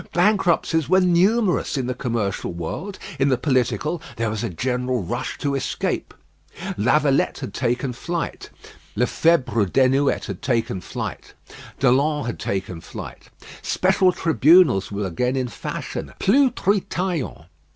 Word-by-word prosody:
Bankruptcies 175 -5 +2
were 185 +1 +5
numerous 185 0 +2
in 130 - -1
the 125 - -1
commercial 115 -8 -2
world; 85 - -5 0.2
in 135 +1 +3
the 130 - +2
political, 140 +5 0
there 115 -2 -1
was 110 +1 -3
a 115 - -1
general 125 +4 -1
rush 120 +8 -4
to 140 -1 -1
escape. 135 - -2 0.6
Lavalette 135 +6 +2
had 130 - -6
taken 125 +1 -1
flight, 170 +6 -4 0.5
Lefebvre 125 - +2
Desnouettes 135 +6 +2
had - - -6
taken 120 -7 -1
flight, - - -6 0.4
Delon 140 +3 +2
had 120 - -4
taken 95 -3 -3
flight. - - -9 0.3
Special 185 0 +2
tribunals 160 - +4
were 100 0 -2
again 125 +9 -1
in 130 -2 -1
fashion - - -6
plus 260 +6 +4
Treetaillon. 185 -6 -1
135 Hz, 130 wpm, -22 LUFS, 120-170 Hz, 0.6 s, were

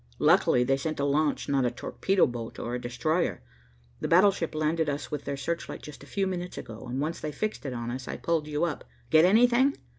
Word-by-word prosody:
Luckily 125 - +4
they 135 +2 +2
sent 155 +2 -3
a 140 - +1
launch, 145 +1 +1
not 135 -2 +2
a 125 - +2
torpedo 190 +9 +1
boat 120 -2 -6
or 120 - -4
a 125 - -3
destroyer. 155 +8 -1 0.6
The - - -2
battleship 180 -2 +3
landed 155 0 +1
us 145 +2 -4
with 150 -1 -4
their 140 - -3
searchlight 170 +5 -4
just 150 -2 -10
a - - -13
few 195 +4 -1
minutes 180 -1 -4
ago, 110 -1 -8
and 130 +2 -2
once 155 +4 -2
they 155 - -4
fixed 215 -3 -3
it 130 - -3
on 120 -1 -4
us, 130 +1 -6
I - - -4
pulled 165 -3 -1
you 150 +1 -1
up. 170 -3 -2 0.3
Get 160 +1 +7
anything?" 245 +7 +4
150 Hz, 220 wpm, -28 LUFS, 135-170 Hz, 0.6 s, Get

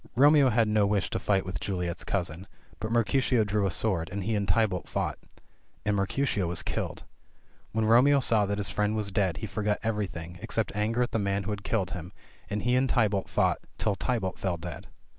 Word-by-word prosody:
Romeo 145 +1 +6
had 115 -1 +3
no 105 -1 +3
wish 100 -2 0
to - - -1
fight 100 -2 +1
with 90 -2 -4
Juliet's 90 -2 -3
cousin, 90 -1 -2 0.3
but 110 - -4
Mercutio 120 +1 +2
drew 105 -1 0
a - - 0
sword, 90 -3 -1
and 100 -1 -3
he 110 +4 -1
and 100 -2 0
Tybalt 90 -1 +1
fought. - - -2 0.7
And 105 0 +2
Mercutio 100 0 0
was 85 0 -2
killed. - - -3 0.7
When 110 0 0
Romeo 130 +6 +6
saw 110 -5 +2
that 100 +1 -1
his 100 -1 0
friend 105 +1 0
was 105 -2 +2
dead 95 -4 +1
he - - -4
forgot 105 0 -1
everything, 90 -6 -3
except - - -2
anger 110 +4 +1
at 120 - -3
the 115 - 0
man 100 0 0
who 105 - -3
had 100 -1 -4
killed 105 -4 -1
him, 90 +1 -7 0.4
and 105 +1 -2
he 125 +1 +2
and 130 +1 +2
Tybalt 105 -5 +1
fought, - - +2 0.2
till 105 - +1
Tybalt 105 -5 -2
fell 90 -3 -1
dead. 85 -2 -7
105 Hz, 205 wpm, -28 LUFS, 95-115 Hz, 0.7 s, Romeo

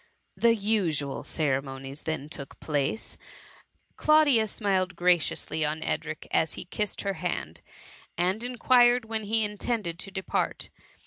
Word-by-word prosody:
The 230 -1 +4
usual 185 -10 0
ceremonies 135 -1 -2
then 160 -3 -3
took 140 -2 -8
place: 150 +7 -2 0.4
— - - -33
Claudia 295 -8 +5
smiled 190 -3 0
graciously 175 -2 +1
on 155 +1 -1
Edric 155 -1 -3
as 160 - +2
he - - -7
kissed 210 +3 -3
her 200 -1 -1
hand, 180 - -3 0.6
and 185 +6 +1
inquired 245 -1 +4
when 220 -1 -2
he 220 +2 +2
in 210 -1 -4
tended 200 -9 -2
to 190 - -6
depart. 190 -1 -2
185 Hz, 135 wpm, -27 LUFS, 155-220 Hz, 0.6 s, Claudia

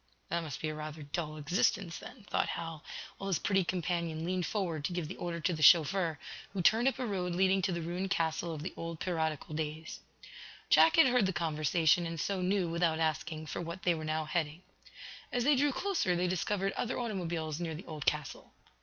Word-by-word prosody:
"That 170 0 0
must 155 -5 -6
be 155 - 0
rather 155 0 -6
a - - -6
dull 155 +1 -4
existence, 175 +3 0
then," 245 -4 -11
thought - - 0
Hal, 165 -2 -5 0.4
while 195 - -4
his 190 -4 +2
pretty 195 -2 +2
companion 170 -2 -2
leaned 180 0 -1
forward 175 -8 -2
to 180 - -2
give 175 -3 -2
the - - -6
order 170 -1 -3
to 180 - +1
the 155 - -4
chauffeur, 165 0 +5 0.4
who 190 -3 -1
turned 225 +7 +5
up 270 - +2
a 255 - -2
road 180 -5 -2
leading 190 +1 +3
to 190 +1 0
the 170 -1 -2
ruined 180 +3 -3
castle 165 -2 0
of 155 -2 -5
the 180 - -4
old 165 -1 -5
piratical 160 -4 -2
days. 155 +1 -4 0.7
Jack 325 - +7
had 325 - +8
heard 250 -5 +3
the 190 - -1
conversation, 160 +1 +2
and 165 -1 -5
so 195 +3 -1
knew, 185 0 +1
without 165 -1 +1
asking, 155 0 -1
for 155 - -4
what 170 +2 -6
they 175 - +4
were 160 -1 -5
now 155 0 -1
heading. 160 +1 -2 0.7
As 245 - +1
they 290 +3 +5
drew 285 +2 +3
closer 335 - 0
they 175 +1 +1
discovered 195 +2 0
other 245 - -2
automobiles 170 -9 -2
near 165 -2 -3
the 165 - -9
old 155 -3 -7
castle. 150 -2 -1
170 Hz, 210 wpm, -32 LUFS, 160-190 Hz, 0.7 s, had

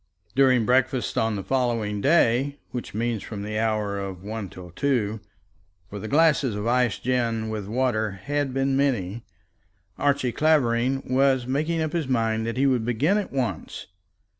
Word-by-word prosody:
During 130 -4 +4
breakfast 130 +1 +1
on 110 -1 +1
the 100 - -4
following 115 -5 -1
day, 140 -1 +3
which 125 -4 -6
means 115 -1 -1
from 105 -2 -6
the 105 +1 -3
hour 105 -3 0
of 95 -2 -6
one 105 -1 -5
till 90 -1 -11
two, 110 - 0 0.7
for 105 - -6
the 110 - -6
glasses 145 -4 +3
of 105 +1 -4
iced 125 -1 +1
gin 115 -3 0
and 105 -3 -4
water 110 -3 0
had 145 -1 -1
been 135 +1 0
many, 120 -6 0 0.8
Archie 140 -3 +1
Clavering 135 -3 +2
was 130 -1 +2
making 155 +5 0
up 155 - -3
his 165 -5 -1
mind 115 -3 0
that 115 - -3
he 135 - +3
would 130 -4 +2
begin 135 - +1
at 205 - -5
once. 120 - -3
120 Hz, 165 wpm, -25 LUFS, 110-135 Hz, 0.8 s, During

